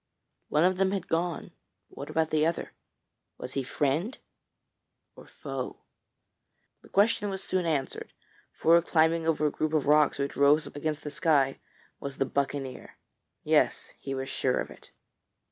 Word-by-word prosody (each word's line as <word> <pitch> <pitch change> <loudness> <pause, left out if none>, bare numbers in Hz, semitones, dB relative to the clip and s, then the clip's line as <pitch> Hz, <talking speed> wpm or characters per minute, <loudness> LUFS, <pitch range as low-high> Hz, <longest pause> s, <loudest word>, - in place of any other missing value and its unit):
One 150 +2 +3
of 185 +1 +3
them 190 0 +3
had 190 -3 -3
gone, 170 0 -2 0.4
but - - -20
what - - -7
about 160 -1 0
the 155 -1 +2
other? 165 +1 -1 0.7
Was 125 - -7
he 135 - 0
friend 150 - -1 1.0
or - - -14
foe? - - -6 1.0
The - - -18
question 205 0 +2
was 195 0 -4
soon 185 -2 -1
answered, 145 -5 -2 0.4
for 170 +1 +4
climbing 165 0 +2
over 155 -2 +2
a 150 - +2
group 155 +1 -2
of 155 -3 +2
rocks 150 0 +4
which 140 0 -2
rose 145 +2 +4
against 150 +1 -4
the 150 - -5
sky 140 -5 +2 0.4
was 140 -1 -6
the 135 - +1
buccaneer. 140 -1 -3 0.5
Yes; - - +1
he 135 -1 -4
was 135 0 -4
sure - - 0
of - - -4
it. - - -15
155 Hz, 160 wpm, -28 LUFS, 140-170 Hz, 1.0 s, for